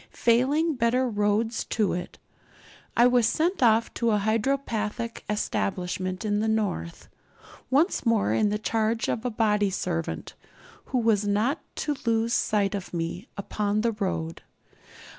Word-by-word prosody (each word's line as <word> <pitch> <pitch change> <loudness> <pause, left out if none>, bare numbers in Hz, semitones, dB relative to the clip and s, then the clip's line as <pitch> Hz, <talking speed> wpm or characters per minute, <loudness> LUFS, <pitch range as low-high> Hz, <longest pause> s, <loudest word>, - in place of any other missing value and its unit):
Failing 275 +8 +3
better 250 0 +1
roads 215 +1 0
to 215 -4 0
it, 175 0 -5 0.8
I 240 - +7
was 245 -2 +4
sent 340 - 0
off 225 -1 +4
to 235 - 0
a 210 - +3
hydropathic 225 0 -1
establishment 185 -2 -2
in 205 -1 +1
the 220 - 0
north, 205 - -2 0.6
once 295 +9 +2
more 230 -4 +2
in 215 -1 +2
the 210 - 0
charge 225 +1 0
of 230 - -2
a - - +1
body 210 -3 +2
servant, 175 -3 -3 0.5
who 260 - -2
was 220 -4 +2
not 215 +9 +1 0.2
to 295 - -2
lose 230 0 +2
sight 210 -3 +1
of 195 -3 -5
me 170 +2 -4
upon 205 +1 -1
the 230 +1 +1
road. 185 -6 -3
220 Hz, 140 wpm, -26 LUFS, 205-235 Hz, 0.8 s, I